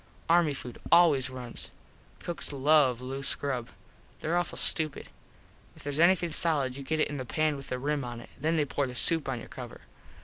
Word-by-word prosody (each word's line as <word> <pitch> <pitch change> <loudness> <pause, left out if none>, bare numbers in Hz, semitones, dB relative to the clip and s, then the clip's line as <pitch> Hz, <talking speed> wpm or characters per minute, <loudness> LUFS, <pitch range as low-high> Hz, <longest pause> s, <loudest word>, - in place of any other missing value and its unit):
Army 165 -3 +3
food 125 -2 -8
always 155 -7 +5
runs. 125 -2 -7 0.5
Cooks 170 -3 -4
love 140 -3 +3
loose 135 +2 -1
grub. 130 -4 -3 0.5
There 165 +2 -1
awful 175 0 -1
stupid. 155 -3 +2 0.6
If - - -15
theres 145 +1 -3
anything 170 0 +4
solid 145 -6 +2
you 140 - -7
get 155 +3 -2
it - - +3
in 145 - -5
the 130 - -4
pan 155 +4 0
with 140 -1 -9
the 125 - -2
rim 145 +2 -1
on 120 -1 -6
it. - - -13
Then 160 +4 0
they 150 - +2
pour 140 0 -1
the 125 - -7
soup 160 +2 +2
on 130 - -2
your - - -10
cover. - - -9
145 Hz, 200 wpm, -29 LUFS, 130-160 Hz, 0.6 s, always